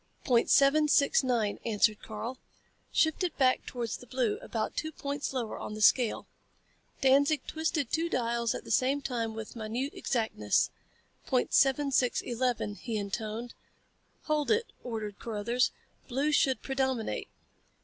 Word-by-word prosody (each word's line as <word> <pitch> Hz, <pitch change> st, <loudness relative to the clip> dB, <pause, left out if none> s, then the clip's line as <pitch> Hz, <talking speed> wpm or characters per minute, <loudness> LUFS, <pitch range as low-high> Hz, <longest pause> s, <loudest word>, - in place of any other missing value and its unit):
"Point 240 Hz, -3 st, +3 dB
seven 290 Hz, +2 st, +5 dB
six 285 Hz, -1 st, +4 dB
nine," 235 Hz, -5 st, 0 dB
answered 215 Hz, -1 st, +2 dB
Karl. 235 Hz, +4 st, -6 dB, 0.5 s
"Shift 315 Hz, +3 st, +2 dB
it 350 Hz, -4 st, -2 dB
back 255 Hz, -2 st, +2 dB
towards 235 Hz, -3 st, -3 dB
the 250 Hz, -, -14 dB
blue, 245 Hz, -3 st, 0 dB
about 220 Hz, -2 st, -3 dB
two 315 Hz, -, -2 dB
points 285 Hz, -1 st, -4 dB
lower 245 Hz, -5 st, -3 dB
on 210 Hz, -, -6 dB
the -, -, -7 dB
scale." 235 Hz, +1 st, +4 dB, 0.8 s
Danzig 280 Hz, +3 st, +4 dB
twisted 315 Hz, -4 st, -2 dB
two 330 Hz, +2 st, 0 dB
dials 235 Hz, -3 st, 0 dB
at -, -, -6 dB
the -, -, -8 dB
same 270 Hz, +5 st, +2 dB
time 230 Hz, -4 st, -2 dB
with 220 Hz, +1 st, -7 dB
minute 235 Hz, +5 st, -3 dB
exactness. 220 Hz, -, 0 dB, 0.6 s
"Point 255 Hz, -1 st, +1 dB
seven 275 Hz, +1 st, +4 dB
six 250 Hz, -2 st, +2 dB
eleven," 240 Hz, -3 st, -1 dB
he 220 Hz, +2 st, -4 dB
intoned. 215 Hz, +3 st, -4 dB, 0.7 s
"Hold 300 Hz, -2 st, 0 dB
it," 450 Hz, +2 st, +3 dB, 0.2 s
ordered 220 Hz, -4 st, -5 dB
Carruthers. 235 Hz, +3 st, 0 dB, 0.4 s
"Blue 275 Hz, +4 st, 0 dB
should 270 Hz, -3 st, +2 dB
predominate." 265 Hz, -4 st, -1 dB
250 Hz, 145 wpm, -30 LUFS, 225-280 Hz, 0.8 s, seven